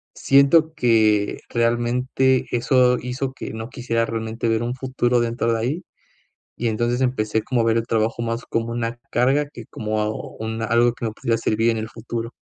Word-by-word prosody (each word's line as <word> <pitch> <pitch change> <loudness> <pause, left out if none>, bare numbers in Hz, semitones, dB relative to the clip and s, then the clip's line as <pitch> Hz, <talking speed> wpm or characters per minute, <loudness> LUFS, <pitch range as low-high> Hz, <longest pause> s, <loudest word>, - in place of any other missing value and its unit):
siento 155 +4 +4
que, 110 -6 +3
realmente, 125 +2 +1
eso 125 +1 +3
hizo 130 +2 -3
que 130 - -7
no 110 +2 -6
quisiera, 115 -3 -1
realmente, 115 0 -3
ver 115 +1 +1
un 120 +1 -2
futuro 125 -2 0
dentro 115 0 0
de 115 - 0
ahí. 135 +10 -2 0.7
Y 120 - -1
entonces, 120 +3 0
empecé 110 -4 0
como 125 -3 0
a - - +1
ver 115 0 +3
el 115 - -1
trabajo 115 +1 0
más 115 +1 -2
como 115 0 -1
una 115 0 -3
carga, 135 +4 +2
que 120 - -9
como 110 0 -2 0.3
un 110 +1 -4
algo 115 +1 +3
que 120 - -6
me 110 - -1
pudiera 115 +1 -1
servir 115 +1 +1
en 115 - -2
el 110 - -5
futuro. 115 +1 -5
115 Hz, 185 wpm, -22 LUFS, 115-125 Hz, 0.7 s, siento